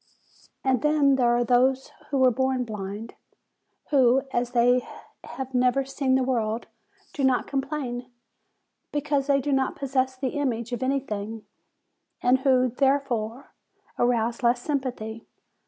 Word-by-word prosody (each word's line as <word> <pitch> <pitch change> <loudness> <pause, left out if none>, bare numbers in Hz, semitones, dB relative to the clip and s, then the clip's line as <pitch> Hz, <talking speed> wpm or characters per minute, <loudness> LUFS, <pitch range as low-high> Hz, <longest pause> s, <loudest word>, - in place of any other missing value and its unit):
"And 260 -3 +2
then 300 -2 +3
there 250 -2 +3
are 240 0 +3
those 255 +2 +2 0.2
who 280 - 0
were 260 -1 +5
born 260 +1 0
blind, 210 0 -6 0.8
who, 265 -2 +4
as 240 0 0
they 245 +1 +3 0.4
have 265 -1 -7
never 255 +2 +2
seen 265 -1 0
the 260 - +2
world, 230 -3 -1 0.5
do 280 - -3
not 260 -2 +2
com 275 -1 -1
plain, 255 -4 -5 0.8
because 290 -1 -1
they 280 -1 +3
do 285 +2 -2
not 270 -1 +1
possess 260 -1 -1
the 260 0 -2
image 245 -4 -2
of 245 0 -3
any 270 +1 +1
thing, 215 -2 -6 0.7
and 250 +1 +3
who, 255 -1 +3
therefore, 260 -2 -1 0.5
arouse 235 0 +1
less 240 0 +3
sympathy. 245 -6 -4
255 Hz, 140 wpm, -25 LUFS, 240-270 Hz, 0.8 s, were